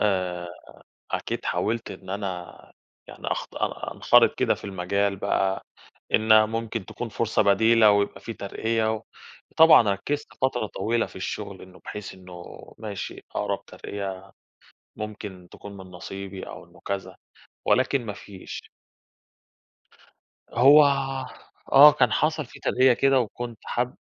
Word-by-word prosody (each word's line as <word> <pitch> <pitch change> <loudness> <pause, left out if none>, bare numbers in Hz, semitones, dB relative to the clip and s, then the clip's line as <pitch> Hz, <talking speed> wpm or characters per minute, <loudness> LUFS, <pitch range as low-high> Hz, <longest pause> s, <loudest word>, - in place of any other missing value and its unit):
آآ، 90 -4 0 0.6
أكيد - - -3
حاولت 115 +2 -1
إن 95 - -9
أنا 95 -3 -6 0.4
يعني - - -10
أخط - - -3
أ - - -3
أنخرِط - - +5
كده - - +2
في - - -14
المجال 100 +1 -1
بقى 95 0 0 0.5
إن 110 0 +6
ممكن 115 -2 -3
تكون 120 - -6
فرصة 110 0 +1
بديلة 110 +2 +5
ويبقى 100 0 +1
في 115 - -6
ترقية 110 +2 -1
و 110 - -7 0.5
وطبعًا 160 -4 +8
ركّزت 140 +10 -2
فترة 125 -4 +1
طويلة 115 +3 -1
في - - -15
الشغل 100 +1 -5
إنه 95 0 -14
بحيث 105 -1 -7
إنه 90 -2 -11 0.4
ماشي 105 -3 -6
أقرَب - - -2
ترقية 95 -1 -7 0.6
ممكن 105 -4 -7
تكون 100 -1 -11
من 95 -1 -10
نصيبي 95 +2 -8
أو - - -9
إنه - - -20
كذا 100 -1 -4 0.5
ولكن 130 -1 +2
ما 105 - -3
فيش. 100 -1 -10 1.8
هو 140 +6 +8 0.9
آه 145 +2 +10
كان 125 -5 +2
حصَل 155 +2 +1
في - - -14
ترقية 130 0 +4
كده 135 +2 +3
وكنت 120 0 -4
حاب 125 +1 -2
105 Hz, 130 wpm, -25 LUFS, 95-115 Hz, 1.8 s, آه